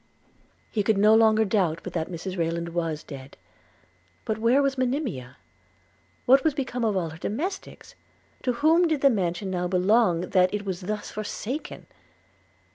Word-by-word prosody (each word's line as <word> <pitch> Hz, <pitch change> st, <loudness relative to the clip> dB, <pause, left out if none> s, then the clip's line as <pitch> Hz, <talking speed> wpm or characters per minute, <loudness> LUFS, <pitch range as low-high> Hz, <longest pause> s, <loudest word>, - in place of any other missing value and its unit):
He 215 Hz, -, 0 dB
could 205 Hz, +1 st, +1 dB
no 210 Hz, +2 st, +5 dB
longer 220 Hz, 0 st, +5 dB
doubt 185 Hz, -6 st, 0 dB
but -, -, -7 dB
that 160 Hz, -1 st, -2 dB
Mrs 185 Hz, +2 st, -5 dB
Rayland 170 Hz, -1 st, -2 dB
was 165 Hz, -3 st, -3 dB
dead 135 Hz, -2 st, -11 dB, 0.4 s
– 90 Hz, 0 st, -37 dB
But 220 Hz, 0 st, -2 dB
where 235 Hz, +5 st, +3 dB
was 275 Hz, -1 st, +1 dB
Monimia? 245 Hz, -, -3 dB, 0.9 s
what 265 Hz, +2 st, +5 dB
was 315 Hz, -3 st, +1 dB
become 255 Hz, -4 st, -3 dB
of 215 Hz, -3 st, +1 dB
all 165 Hz, -3 st, -2 dB
her 160 Hz, -, -11 dB
domestics? 340 Hz, -, -5 dB, 0.5 s
to 250 Hz, -, 0 dB
whom 320 Hz, +7 st, +3 dB
did 310 Hz, -4 st, -1 dB
the 275 Hz, -, +5 dB
mansion 190 Hz, -2 st, -2 dB
now 180 Hz, -1 st, -1 dB
belong, 185 Hz, 0 st, +3 dB
that 185 Hz, -1 st, +4 dB
it 205 Hz, 0 st, -3 dB
was 190 Hz, -1 st, -4 dB
thus 210 Hz, +3 st, -4 dB
forsaken? 215 Hz, +6 st, -5 dB
205 Hz, 165 wpm, -25 LUFS, 170-245 Hz, 0.9 s, no